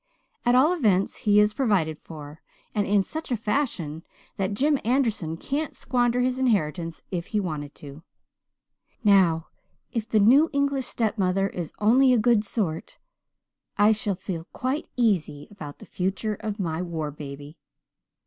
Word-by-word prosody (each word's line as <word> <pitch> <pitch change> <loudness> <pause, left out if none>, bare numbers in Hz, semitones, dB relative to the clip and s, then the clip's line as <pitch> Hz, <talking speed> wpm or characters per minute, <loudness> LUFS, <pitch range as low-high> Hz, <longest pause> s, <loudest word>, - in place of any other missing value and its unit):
"At 245 - +5
all 290 +7 +5
events 205 - +2
he 205 0 +6
is 210 0 +4
provided 190 - +1
for, 150 -1 -11 0.3
and 205 -2 0
in 200 -1 +3
such 315 +5 -7
a 240 - +1
fashion 210 - -2 0.4
that 195 +1 -1
Jim 285 +4 +2
Anderson 220 - 0
can't 290 - -3
squander 245 -1 +1
his 255 +1 0
inheritance 170 -9 0
if 175 -2 -3
he 215 - 0
wanted 150 -6 -4
to. 145 +1 -11 1.0
Now, 180 -6 +4 0.4
if 225 -1 -3
the 220 - +3
new 270 +10 +6
English 280 -2 0
stepmother 195 -4 0
is 175 -5 -5
only 255 +5 +5
a - - +4
good 225 -1 +3
sort 190 -7 -3 0.8
I 205 +1 +5
shall 215 -2 -1
feel 180 -3 -5
quite 265 +5 -2
easy 180 -11 0
about 150 -8 -9
the - - -13
future 195 +4 -2
of 210 0 -5
my 165 -3 -2
war 160 -4 -3
baby. 145 +1 -9
205 Hz, 150 wpm, -25 LUFS, 165-240 Hz, 1.0 s, he